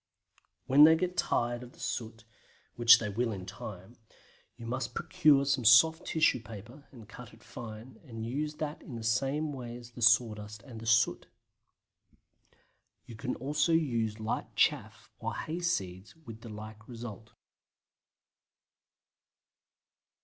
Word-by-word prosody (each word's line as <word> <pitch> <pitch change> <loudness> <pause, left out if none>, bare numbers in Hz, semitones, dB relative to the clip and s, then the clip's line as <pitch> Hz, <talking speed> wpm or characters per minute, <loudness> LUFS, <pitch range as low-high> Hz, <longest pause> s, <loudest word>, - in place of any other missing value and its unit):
When 140 +3 +6
they 160 +1 +8
get 180 +2 -2
tired 120 -5 0
of 125 0 -13
soot 115 -1 -5 0.5
(which 120 0 +8
they 110 - -4
will 115 +3 -1
in 95 -3 -6
time) 95 +4 -9 0.6
you 115 - -10
must 120 0 -4
procure 140 -2 +3
some 140 -2 0
soft 160 +9 +6
tissue 160 -5 +2
paper 115 +6 -12
and 115 -5 -14
cut 115 0 -12
it 110 - -22
fine, 115 +1 -10
and 115 -6 -7
use 150 +5 -3
that 150 0 -5
in 125 - -9
the 115 - -6
same 135 +6 0
way 120 -3 -7
as 120 0 -13
the 120 - -11
sawdust 110 -2 +2
and 120 -5 -10
the 115 - -8
soot. 115 0 +2 1.8
You 115 - -11
can 125 +3 -4
also 145 +5 0
use 115 -9 0
light 110 +1 -4
chaff - - 0
or - - -4
hay 165 +3 -4
seeds 95 - -3
with 115 -9 -12
the 115 - -10
like 110 +1 -10
result. 115 -3 -9
120 Hz, 140 wpm, -30 LUFS, 110-140 Hz, 1.8 s, they